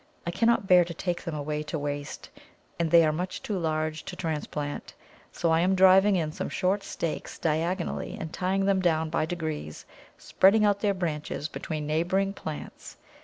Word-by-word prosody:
I 170 Hz, -, -1 dB
cannot 230 Hz, +2 st, +2 dB
bear 180 Hz, -2 st, +6 dB
to 170 Hz, -1 st, -7 dB
take 175 Hz, +1 st, -3 dB
them 165 Hz, -, -3 dB
away 150 Hz, 0 st, -3 dB
to 150 Hz, +1 st, -4 dB
waste, 145 Hz, 0 st, -5 dB, 0.5 s
and 170 Hz, -1 st, +1 dB
they 165 Hz, 0 st, +7 dB
are 155 Hz, -, +2 dB
much 180 Hz, +4 st, -4 dB
too 210 Hz, -, -2 dB
large 155 Hz, -1 st, -1 dB
to 185 Hz, -, -6 dB
transplant, 150 Hz, -4 st, -4 dB, 0.4 s
so 170 Hz, -, 0 dB
I 160 Hz, -, +4 dB
am 185 Hz, +3 st, +3 dB
driving 190 Hz, +2 st, +6 dB
in 160 Hz, -4 st, 0 dB
some -, -, -4 dB
short 190 Hz, +2 st, 0 dB
stakes 170 Hz, -4 st, -4 dB
diagonally 170 Hz, +3 st, -2 dB
and 160 Hz, 0 st, -6 dB
tying 190 Hz, +1 st, 0 dB
them 195 Hz, -1 st, +3 dB
down 160 Hz, -3 st, +1 dB
by 155 Hz, -, 0 dB
degrees, 155 Hz, -, -5 dB, 0.3 s
spreading 210 Hz, +3 st, +4 dB
out 205 Hz, -1 st, +2 dB
their 200 Hz, -2 st, +1 dB
branches 150 Hz, -4 st, -3 dB
between 155 Hz, -1 st, -5 dB
neighbouring 175 Hz, +6 st, 0 dB
plants. 155 Hz, -6 st, -8 dB
170 Hz, 175 wpm, -27 LUFS, 155-190 Hz, 0.5 s, they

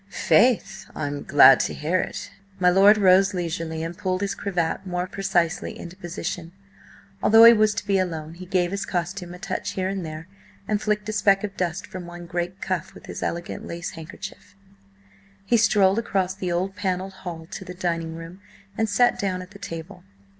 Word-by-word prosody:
"Faith! 195 Hz, -4 st, +2 dB
I'm 145 Hz, -1 st, -3 dB
glad 140 Hz, -1 st, +7 dB
to -, -, -1 dB
hear 165 Hz, +5 st, 0 dB
it!" -, -, -5 dB, 0.3 s
My 180 Hz, -1 st, +5 dB
lord 200 Hz, +3 st, +6 dB
rose 190 Hz, 0 st, +5 dB
leisurely 165 Hz, -2 st, -3 dB
and 165 Hz, +1 st, -5 dB
pulled 185 Hz, +1 st, -2 dB
his 200 Hz, -1 st, -1 dB
cravat 180 Hz, -2 st, -2 dB
more 180 Hz, 0 st, -2 dB
precisely 180 Hz, -3 st, -1 dB
into 170 Hz, +1 st, -9 dB
position. 175 Hz, -1 st, -5 dB, 0.7 s
Although 225 Hz, +1 st, +7 dB
he 230 Hz, 0 st, +11 dB
was 215 Hz, -1 st, +3 dB
to -, -, -4 dB
be 195 Hz, -1 st, +2 dB
alone, 160 Hz, -4 st, -3 dB
he 180 Hz, +2 st, -10 dB
gave 180 Hz, -1 st, +1 dB
his 200 Hz, 0 st, -2 dB
costume 180 Hz, 0 st, -4 dB
a -, -, -10 dB
touch -, -, -4 dB
here 185 Hz, 0 st, -1 dB
and 195 Hz, -2 st, -3 dB
there, 155 Hz, +1 st, -7 dB, 0.4 s
and 210 Hz, -1 st, 0 dB
flicked 210 Hz, 0 st, -1 dB
a -, -, -2 dB
speck 200 Hz, -2 st, +3 dB
of 200 Hz, -2 st, -4 dB
dust 180 Hz, +1 st, -2 dB
from 185 Hz, -4 st, -8 dB
one 175 Hz, 0 st, -9 dB
great 175 Hz, +2 st, -4 dB
cuff 185 Hz, -4 st, -3 dB
with -, -, -13 dB
his -, -, -7 dB
elegant 170 Hz, +1 st, -4 dB
lace 170 Hz, 0 st, -5 dB
handkerchief. 165 Hz, +4 st, -10 dB, 0.9 s
He 235 Hz, -, +2 dB
strolled 205 Hz, -2 st, +4 dB
across 190 Hz, -5 st, -1 dB
the 185 Hz, -2 st, -4 dB
old 185 Hz, +3 st, -1 dB
panelled 190 Hz, 0 st, -2 dB
hall 165 Hz, -3 st, -6 dB
to -, -, -6 dB
the 180 Hz, -1 st, -9 dB
dining 170 Hz, -2 st, -2 dB
room, 165 Hz, +3 st, -10 dB, 0.3 s
and 220 Hz, 0 st, 0 dB
sat 245 Hz, +4 st, +3 dB
down 185 Hz, -2 st, -2 dB
at 185 Hz, -, -15 dB
the 200 Hz, -, -13 dB
table. 175 Hz, +1 st, -8 dB
185 Hz, 190 wpm, -24 LUFS, 170-195 Hz, 0.9 s, he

